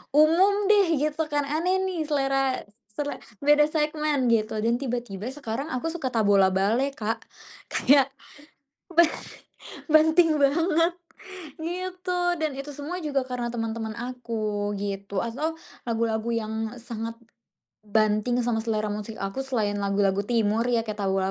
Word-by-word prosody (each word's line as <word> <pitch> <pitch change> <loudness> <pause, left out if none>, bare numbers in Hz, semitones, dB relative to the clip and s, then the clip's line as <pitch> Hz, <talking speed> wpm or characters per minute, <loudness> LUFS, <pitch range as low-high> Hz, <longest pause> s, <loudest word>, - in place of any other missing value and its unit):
umum 375 +7 +5
deh 390 -6 +4
gitu 305 +1 -1
kan. 290 -1 +1
Aneh 360 +6 0
nih 335 -5 -2
selera 270 -2 +1
s 205 - -26 0.2
sele 290 -1 -3 0.3
beda 295 +1 +6
segmen 300 -3 0
gitu 215 -1 +1
dan 235 +1 +2
tiba 245 -2 -1
tiba 195 -2 -7
sekarang 270 -1 -4
aku 255 +5 -3
suka 275 -7 -2
Tabola 200 -4 +4
Bale, 225 +9 +2
Kak. 225 +1 -3 0.5
Kayak, 275 -1 +4 0.8
ba 340 +1 +7 0.9
banting 315 0 +5
banget. 330 +4 +3 0.7
Gitu 365 +2 -3 0.2
dan 310 -2 0
itu 275 +2 -6
semua 295 +6 -5
juga 280 -3 0
karena 245 -2 -3
teman-teman 225 -1 -3
aku 225 -4 -3
gitu 200 0 -4
atau 300 +8 -3 0.3
lagu-lagu 225 0 0
yang 220 -1 -2 0.3
sangat, 230 -1 -5 0.7
banting 215 +3 +2
sama 235 -1 0
selera 215 -2 -1
musik 210 +1 -5
aku 195 +6 -3
selain 210 -6 0
lagu-lagu 200 -1 +1
timur 225 -1 +1
ya 235 -2 +2
kayak 215 0 -5
Tabola 190 0 +1
245 Hz, 140 wpm, -26 LUFS, 215-305 Hz, 0.9 s, ba